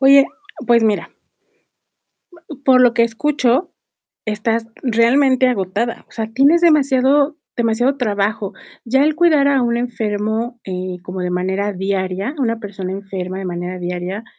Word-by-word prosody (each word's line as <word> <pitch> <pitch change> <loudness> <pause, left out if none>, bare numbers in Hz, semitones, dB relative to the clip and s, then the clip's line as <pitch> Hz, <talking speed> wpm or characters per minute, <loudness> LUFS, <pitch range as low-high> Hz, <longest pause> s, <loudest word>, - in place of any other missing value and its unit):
Oye, 275 0 +7 0.4
pues 235 -1 +4
mira 215 -2 0 1.5
por 255 -1 +5
lo 245 -2 +5
que 235 - +3
escucho 260 +4 0 0.5
estás 225 +2 -1 0.2
realmente 255 +2 +3
agotada. 220 +1 -2
O - - -22
sea, 220 -1 -4
tienes 280 +8 +4
demasiado 285 -2 +3 0.2
demasiado 240 +3 +1
trabajo. 205 -4 -1 0.3
Ya 265 +4 +2
el 305 0 +2
cuidar 315 -4 +4
a 275 -2 +3
un 235 0 0
enfermo, 225 0 -2
eh, 185 -1 -4
como 185 0 -6
de 180 - -2
manera 190 +3 -1
diaria, 195 +5 -2
una 230 -4 0
persona 195 -3 -6
enferma 190 -1 -5
de 195 - -6
manera 180 0 -4
diaria 180 +4 -4
230 Hz, 140 wpm, -18 LUFS, 195-265 Hz, 1.5 s, Oye